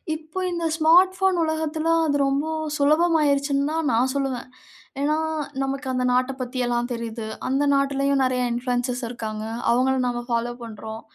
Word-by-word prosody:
இப்போ 315 +4 -7
இந்த 340 -1 -2
smart 350 +4 +5
phone 380 -2 +2
உலகத்தில 315 0 -1 0.2
அது 285 -2 +1
ரொம்ப 280 +3 0 0.3
சுலபமாயிருச்சுன்னு 285 -2 +2
தான் 320 -4 0
நான் 255 +3 +2
சொல்லுவேன். 265 -3 -2 0.5
ஏன்னா 300 +2 +1 0.5
நமக்கு 270 0 -3
அந்த 250 0 0
நாட்ட 255 +1 +2
பத்தி 250 +1 -5
எல்லாம் 240 +1 -1
தெரிது. 230 -1 -5 0.2
அந்த 275 +2 +1
நாட்டிலயும் 275 0 +1
நெறைய 255 -1 +1
இனபுலுயன்சர்ஸ் 245 +1 -1
இருக்காங்க. 215 -2 -5 0.3
அவங்கள 260 +2 +3
நாம 240 0 -2
பாலோ 235 +1 0
பண்றோம். 220 0 -8
270 Hz, 145 wpm, -23 LUFS, 245-305 Hz, 0.5 s, smart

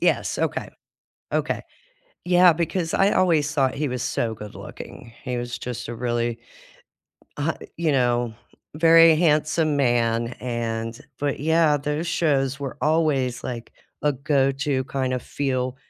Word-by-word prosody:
Yes, - - +1
okay. - - -1 0.7
Okay. - - 0 0.6
Yeah, 180 0 +6
because 165 +1 -2
I 195 +1 +3
always 160 -5 +2
thought 135 -3 +1
he 150 +1 -1
was 125 -1 -3
so 120 -3 -1
good-looking. 105 +2 -10
He 125 -3 -3
was 120 0 -4
just 125 -2 -6
a 120 - -4
really, 120 -1 -1 1.0
uh, 145 +3 0 0.2
you 160 -3 +1
know, 120 -3 +1 0.4
very 165 +1 +7
handsome 155 -1 +2
man 120 -3 +1
and 115 -1 -3 0.2
but 145 -1 -1
yeah, 160 0 +3
those 150 +3 -2
shows 140 -5 +1
were 140 -2 -6
always 150 -6 +1
like 120 -2 -5 0.3
a 150 - +3
go-to 135 0 +1
kinda 130 -1 -1
feel 130 -1 -2
135 Hz, 130 wpm, -23 LUFS, 120-155 Hz, 1.0 s, very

